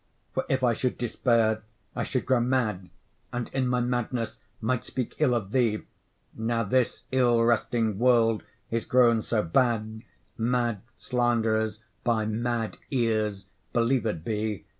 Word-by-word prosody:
For, - - -1
if 130 -1 +1
I 120 -2 +4
should 125 +2 -1
despair, 115 -2 +2 0.3
I - - -1
should 130 - -2
grow 130 -1 +3
mad, 115 -7 0 0.4
And 120 -1 -3
in 130 -1 0
my 125 0 +1
madness 120 -2 -2 0.2
might 115 +2 0
speak 125 -3 -4
ill 135 -6 +3
of 100 -4 -3
thee; 115 -4 +1 0.5
Now 115 +1 -1
this 125 +4 +1
ill 120 -3 +4
wresting 115 -2 +1
world 115 -3 +4 0.3
is 115 0 0
grown 120 -3 +4
so 110 -1 0
bad, 110 +2 +1 0.4
Mad 120 -3 +1
slanderers 110 -3 0 0.2
by 115 -2 +1
mad 115 +1 -2
ears 110 -6 0 0.3
believed 115 -7 +1
be. 105 -5 -2
115 Hz, 140 wpm, -27 LUFS, 110-125 Hz, 0.5 s, I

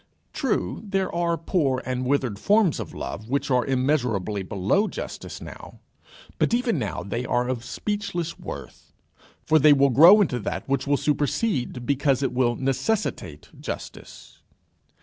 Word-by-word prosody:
True, 270 -7 -1
there 195 -3 -2
are 170 0 0
poor 150 -6 0
and 130 0 -2
withered 130 -7 0
forms 205 - +3
of - - -7
love 110 +2 -6
which 140 +1 -1
are 125 -1 +3
immeasurably 125 -7 0
below 100 - 0
justice - - -7
now; - - -11 0.6
but 235 - +2
even 235 - 0
now 105 -7 -3
they 115 +6 -3
are 125 0 0
of 125 -2 -3
speechless 175 - -4
worth, - - -9 0.5
for 155 0 +4
they 150 +1 +7
will 140 -1 +4
grow 170 - +8
into 145 -12 +1
that 105 - -4
which 140 0 -1
will 145 0 +3
supersede, 145 - -1
because 140 -1 +1
it 135 - -1
will 125 -1 +2
necessitate, 135 - -2
justice. - - -8
140 Hz, 150 wpm, -24 LUFS, 125-175 Hz, 0.6 s, grow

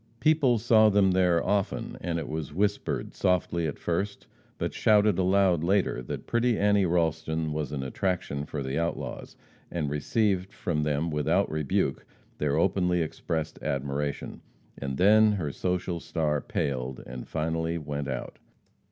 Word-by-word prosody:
People 150 -6 +4
saw 110 -1 +5
them 100 -2 +4
there 90 -2 +3
often, 100 -2 -1
and 85 -1 -2
it 80 - -4
was 75 -2 -5
whispered 100 +2 -1
softly 85 -2 +1
at 75 - -4
first, 100 +4 -2 0.3
but - - -2
shouted 105 -3 +3
aloud 95 -3 +3
later, 95 -7 +1
that - - -6
pretty 120 0 +1
Annie 100 -2 +3
Ralston 80 -2 0
was 75 -2 -3
an 70 -2 -3
attraction 70 -1 -2
for 75 -3 -4
the 65 +3 -2
outlaws, 85 0 -4 0.3
and 75 -5 -2
received 95 +5 0
from 80 -4 -1
them, 75 +2 0
without 75 -2 +1
rebuke, 75 -3 0 0.4
their 75 -1 +1
openly 90 -2 +2
expressed 80 0 -4
admiration, 70 0 -3 0.3
and 70 -1 -4
then 105 +4 +6
her 80 -8 -2
social 90 +1 -2
star 80 -3 -1
paled, 65 -2 -3
and 60 0 -8
finally 80 +1 -1
went 75 -2 -4
out. 65 -2 -5
85 Hz, 145 wpm, -27 LUFS, 75-95 Hz, 0.4 s, then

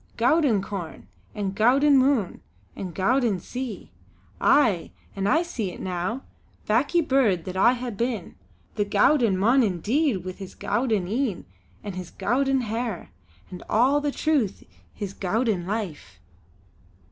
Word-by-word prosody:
Gowden 245 - +3
corn, 190 -6 -7 0.3
and 200 -3 -2
gowden 270 +7 +4
moon, 260 -7 +2 0.3
and 185 -2 -5
gowden 225 0 +1
sea! 250 +2 -6 0.5
Aye! 220 - +3 0.3
an' 195 0 -1
I 320 +10 +3
see 230 - -4
it - - -10
now, 185 +8 -3 0.4
backie 280 +11 +2
bird 220 -11 +2
that 185 - -6
I 235 +6 +4
hae 250 0 -5
been; 230 -2 -3 0.4
the 205 - 0
gowden 205 +1 +3
mon 235 +8 +4
indeed, 210 - 0
wi' 185 - -3
his 190 0 -10
gowden 225 -7 0
een 225 -2 -2 0.4
an' 205 -2 -5
his 180 -1 -7
gowden 270 +1 0
hair 225 - -4 0.4
and 180 - -8
all 265 +6 +3
the 290 -1 -1
truth 280 - 0
o' - - -31 0.2
his 200 -2 -6
gowden 200 -2 -1
life!" 160 - -5
220 Hz, 140 wpm, -25 LUFS, 190-260 Hz, 0.5 s, gowden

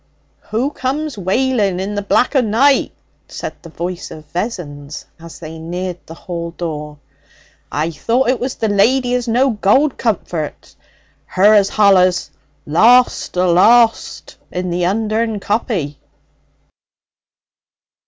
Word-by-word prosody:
'Who 245 +7 -1
comes 290 +1 -3
wailing 205 -1 0
in 195 +2 -3
the 205 - -2
black 245 +7 +1
o' 265 - +5
night?' 250 +5 +2 0.3
said - - -6
the 165 - -12
voice 175 +2 -5
of 155 0 -11
Vessons 155 -8 -5
as 165 0 -11
they 160 0 -9
neared 180 +2 -5
the 165 - -10
hall 170 -1 -6
door. 150 -3 -5 0.7
'I 155 +3 -1
thought 235 +10 0
it 255 - +1
was 255 +1 -3
the 225 - -1
lady 245 +5 +2
as 250 -1 -1
no 255 +4 +2
gold 230 +7 +2
comforts 175 - -3 0.5
her 200 +3 +4
as 200 -2 +4
hollas 185 -3 +3 0.3
"Lost! 230 +6 +3
Alost!" 215 +7 +3
in 180 0 -3
the 175 0 0
Undern 220 +2 -1
Coppy.' 195 - -2
200 Hz, 125 wpm, -17 LUFS, 175-240 Hz, 0.7 s, o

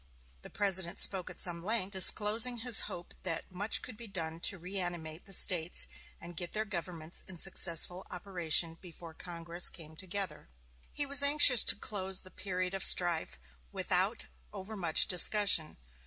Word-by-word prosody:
The - - -14
President 190 -4 -1
spoke 190 -3 +3
at - - -11
some 170 -2 -1
length, 200 -1 -4
disclosing 215 +5 +4
his 235 -1 +6
hope 175 0 -9
that 170 -1 -8
much 200 +4 -3
could 240 -4 -12
be 235 - -10
done 165 -4 -7
to 195 - 0
reanimate 175 -3 -9
the 195 - -12
States 175 -2 +4 0.3
and 175 0 -13
get 175 +1 -7
their 215 0 -3
governments 170 -4 -6
in 185 - -11
successful 180 0 +1
operation 175 -3 -3
before 170 -2 -14
Congress 170 0 -5
came 160 -2 -14
together. 185 - -6 0.4
He 290 - -2
was 280 0 +4
anxious 285 -4 +4
to - - +7
close 190 -2 -6
the 185 - -18
period 185 -1 -7
of 195 - -7
strife 170 - +3 0.3
without - - -3 0.3
over 210 +4 -9
much 170 -5 -1
discussion. 180 -3 +4
185 Hz, 155 wpm, -29 LUFS, 170-205 Hz, 0.4 s, to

